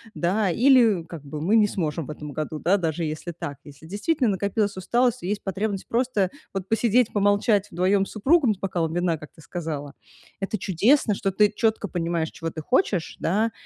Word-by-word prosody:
Да, 190 +3 +1
или 235 -5 +4
как 160 -3 -9
бы 150 +1 -6
"мы 195 +8 +2
не 210 -1 +5
сможем 160 -5 -2
в - - -5
этом 150 -1 -8
году", 155 +1 -4
да, 190 +6 +3
даже 165 -2 -2
если 155 +3 -4
так. 145 -4 -6
Если 145 +2 -14
действительно 245 - 0
накопилась 200 +1 -1
усталость 240 +5 +1
и - - -3
есть 205 +1 -2
потребность 195 0 -3
просто 230 -6 0 0.2
вот 195 -1 -4
посидеть, 230 +1 +2
помолчать 205 0 +2
вдвоем 190 +3 +2
с - - -11
супругом, 265 +2 +3
с - - -24
бокалом 170 -4 -1
вина, 175 -2 0
как 155 - -12
ты - - -17
сказала- 150 -2 -5 0.5
это 195 +2 -2
чудесно, 215 - +2
что 195 0 -1
ты 210 +2 +3
четко 220 -2 +1
понимаешь, 170 -2 -2
чего 165 0 -5
ты 160 - -6
хочешь, 210 - 0
да, 215 +6 +1
195 Hz, 195 wpm, -24 LUFS, 165-215 Hz, 0.5 s, не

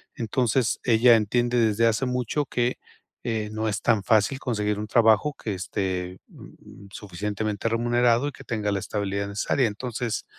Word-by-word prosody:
Entonces, 120 +1 0
ella 120 0 +5
entiende 120 +3 +1
desde 110 0 +2
hace 115 +3 +1
mucho 125 +3 -1
que, 120 0 -1 0.5
eh, 110 -2 -2
no 110 +1 -2
es 100 -1 -2
tan 110 -4 +3
fácil 110 +5 +2
conseguir 105 -5 -1
un 105 - -4
trabajo 115 +6 +3
que 105 - -4
esté, 90 -1 -3
mm, 100 +1 -15
suficientemente 105 +2 -4
remunerado 120 +3 +2
y - - -8
que - - -13
tenga 105 -3 -2
la 100 - 0
estabilidad 100 0 -3
necesaria. 110 +5 0
Entonces, 115 +1 -4
110 Hz, 155 wpm, -25 LUFS, 105-120 Hz, 0.5 s, ella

